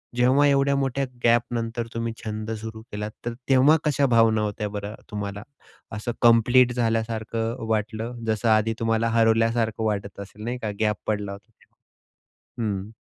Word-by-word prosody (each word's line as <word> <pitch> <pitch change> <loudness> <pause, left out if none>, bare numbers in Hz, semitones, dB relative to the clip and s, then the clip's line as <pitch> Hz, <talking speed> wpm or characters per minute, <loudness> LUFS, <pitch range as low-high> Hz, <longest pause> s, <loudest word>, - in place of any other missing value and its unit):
जेव्हा 130 +4 +4
एवढ्या 140 0 +3
मोठ्या 135 0 0 0.2
गॅपनंतर 115 0 +1
तुम्ही 115 0 -2
छंद 110 0 -5
सुरू 110 0 -7
केलात, 105 +1 -4
तर 120 - -2 0.2
तेव्हा 135 +4 +6
कशा 145 -2 +2
भावना 115 -1 +4
होत्या 105 0 -2
बरं 105 +1 -6 0.2
तुम्हाला? 100 0 -5 0.5
असं 105 +3 -3
कंप्लीट 120 +2 +5
झाल्यासारखं 115 0 -2
वाटलं? 110 +2 -2
जसं 110 +1 +1
आधी 110 +1 +3
तुम्हाला 115 0 +1
हरवल्यासारखं 115 0 +2
वाटत 100 -2 -2
असेल, 100 +2 -9
नाही 120 +3 -3
का? 110 - -2
गॅप 105 -1 +2
पडला 105 -2 -1
होता 100 +3 -11
तेव्हा? - - -32 0.8
हं. 95 +1 -5
115 Hz, 145 wpm, -24 LUFS, 105-120 Hz, 0.8 s, तेव्हा